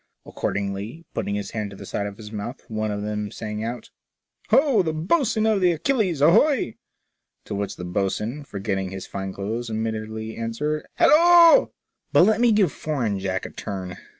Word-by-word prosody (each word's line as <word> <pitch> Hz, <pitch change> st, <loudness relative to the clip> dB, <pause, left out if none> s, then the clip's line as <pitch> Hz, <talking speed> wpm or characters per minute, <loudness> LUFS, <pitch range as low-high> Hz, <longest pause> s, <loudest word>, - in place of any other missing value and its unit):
Accordingly, 105 Hz, +10 st, -4 dB
putting 100 Hz, -, -2 dB
his 105 Hz, -, -4 dB
hand 105 Hz, -2 st, -3 dB
to 100 Hz, -, -11 dB
the -, -, -10 dB
side 100 Hz, -, -3 dB
of 100 Hz, 0 st, -8 dB
his 105 Hz, -2 st, -10 dB
mouth, 110 Hz, +5 st, -6 dB
one 110 Hz, -2 st, -2 dB
of 105 Hz, 0 st, -3 dB
them 105 Hz, 0 st, -3 dB
sang 105 Hz, +1 st, -5 dB
out, 120 Hz, +2 st, -5 dB, 0.6 s
Ho, 260 Hz, -2 st, +4 dB
the 160 Hz, -3 st, -1 dB
bo'sun 215 Hz, -, +1 dB
of 215 Hz, -3 st, +2 dB
the 180 Hz, -1 st, +4 dB
Achilles, 185 Hz, -, 0 dB
ahoy!" 215 Hz, -, +4 dB, 0.7 s
to -, -, -6 dB
which 100 Hz, -1 st, -3 dB
the 90 Hz, -, -7 dB
boatswain, 105 Hz, +9 st, -2 dB
forgetting 100 Hz, -5 st, -3 dB
his 95 Hz, 0 st, -7 dB
fine 95 Hz, -1 st, -5 dB
clothes, 110 Hz, +5 st, -4 dB
immediately 110 Hz, 0 st, -4 dB
answered, 140 Hz, +7 st, -3 dB
Hallo! 340 Hz, +6 st, +7 dB, 0.2 s
" -, -, -53 dB
But -, -, +7 dB
let 215 Hz, +4 st, +3 dB
me 240 Hz, -1 st, +5 dB
give 205 Hz, -7 st, +3 dB
foreign 120 Hz, -10 st, -2 dB
Jack 95 Hz, -1 st, -2 dB
a -, -, -7 dB
turn. 95 Hz, -2 st, -6 dB
110 Hz, 180 wpm, -24 LUFS, -, 0.7 s, Hallo